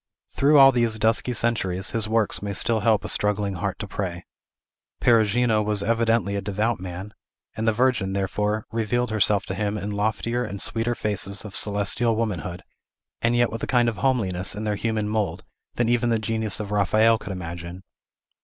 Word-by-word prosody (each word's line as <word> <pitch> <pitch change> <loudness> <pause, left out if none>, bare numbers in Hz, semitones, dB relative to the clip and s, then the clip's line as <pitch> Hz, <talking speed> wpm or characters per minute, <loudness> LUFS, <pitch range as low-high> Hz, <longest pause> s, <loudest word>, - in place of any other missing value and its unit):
Through 145 +2 +4
all 135 -1 +9
these 120 -3 +1
dusky 110 +3 +2
centuries, 105 -5 0
his 110 -2 -1
works 110 -2 0
may 100 0 -3
still 110 +4 +2
help 110 -1 +2
a - - -2
struggling 105 -1 0
heart 95 +1 -3
to 105 - -6
pray. 90 -3 -5 0.7
Perugino 115 -1 +3
was 105 -1 0
evidently 115 -2 +1
a 100 - -2
devout 105 +3 -1
man; 95 +3 -7 0.4
and 110 +1 -2
the - - +5
Virgin, 115 -4 +1
therefore, 105 +3 -1
revealed 115 +2 -1
herself 105 -2 +2
to 95 - -4
him 105 +1 -2
in 105 0 -4
loftier 110 +4 -1
and 100 -4 -6
sweeter 115 +4 -1
faces 100 -1 -1
of 100 -2 -8
celestial 105 +3 +1
womanhood, 90 -6 -3 0.6
and 115 +1 +2
yet 120 0 +2
with 115 0 -5
a - - -3
kind 120 -2 +3
of 115 -3 -1
homeliness 100 -9 0
in 105 - -5
their 105 -1 0
human 110 0 -1
mould, 105 -1 -2 0.3
than 120 - +1
even 120 0 +2
the 115 - +2
genius 110 -2 0
of 105 -1 -5
Raphael 110 +3 +3
could - - -7
imagine. 85 0 -7
105 Hz, 180 wpm, -24 LUFS, 100-115 Hz, 0.7 s, all